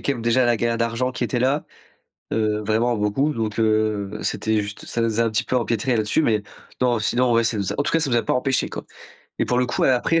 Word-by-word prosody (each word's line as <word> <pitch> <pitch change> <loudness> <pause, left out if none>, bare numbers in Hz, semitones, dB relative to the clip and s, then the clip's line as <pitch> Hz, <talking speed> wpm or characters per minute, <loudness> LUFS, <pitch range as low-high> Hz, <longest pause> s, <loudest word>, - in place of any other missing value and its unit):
quand 140 - +1
même 120 -3 -6
déjà 120 +2 +3
la 120 -1 +3
galère 115 0 0
d'argent 115 +2 -1
qui 125 - -2
était 120 +2 -1
là. 135 +4 +1 0.7
Heu, 105 -1 0
vraiment 115 +2 +1
beaucoup. 120 +9 0
Donc, 110 -2 -3
heu, 110 -2 +1
ben 105 - -7
c'était 110 -1 0
juste 105 0 -6
ça 115 - -2
nous 115 0 0
a - - +4
un 115 - +1
petit 110 - +1
peu 130 - -2
empêtrés 120 +1 0
là-dessus, 110 +8 +1
mais 110 -7 +1 0.4
non 120 -2 +2
sinon 120 +4 +1
ouais 115 0 +3
ça 115 -1 0
nous 100 -2 -1
a, - - -3
en - - +2
tout - - -1
cas 165 - +3
ça 155 -4 0
nous 120 - +1
a 115 - +1
pas - - 0
empêchés, 130 +1 0
quoi - - -6 0.6
et - - +2
pour 125 - 0
le 125 - +2
coup 125 - 0
après 135 +6 +2
115 Hz, 270 wpm, -22 LUFS, 110-125 Hz, 0.7 s, a